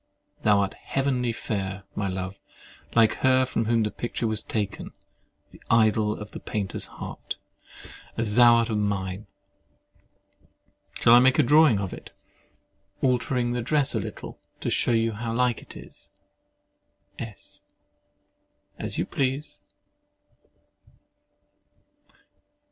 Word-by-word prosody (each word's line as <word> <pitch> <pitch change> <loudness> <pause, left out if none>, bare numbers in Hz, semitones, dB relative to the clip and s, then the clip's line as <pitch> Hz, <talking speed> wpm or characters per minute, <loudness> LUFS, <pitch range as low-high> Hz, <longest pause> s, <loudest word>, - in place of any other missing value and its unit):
Thou 105 -2 +4
art 100 -1 -1
heavenly 130 -3 -1
fair, 100 -4 -4
my 100 - -2
love—like 95 +4 -2
her 130 0 +3
from 115 -2 -1
whom 115 0 +2
the 105 - -1
picture 120 0 -4
was 110 -1 0
taken—the 105 -3 -7
idol 110 -2 +3
of 105 0 -8
the - - -7
painter's 100 -4 -3
heart, - - -7 0.8
as 115 -2 +1
thou 120 0 +7
art 115 0 +1
of 105 - 0
mine! 100 -1 -2 1.7
Shall 115 - +5
I 120 - +9
make 130 +1 +4
a 155 - +5
drawing 150 -3 +5
of 100 -2 -3
it, - - -10 0.9
altering 125 -1 +1
the 120 0 -1
dress 140 +3 +2
a - - 0
little, - - -7 0.2
to - - -1
shew 120 - +3
you 115 0 +2
how 115 +1 -4
like 125 -1 +1
it - - -10
is? - - -13 1.1
S. 115 -3 -8 1.2
As - - -4
you - - 0
please. 135 +2 -2
115 Hz, 120 wpm, -26 LUFS, 105-125 Hz, 1.7 s, I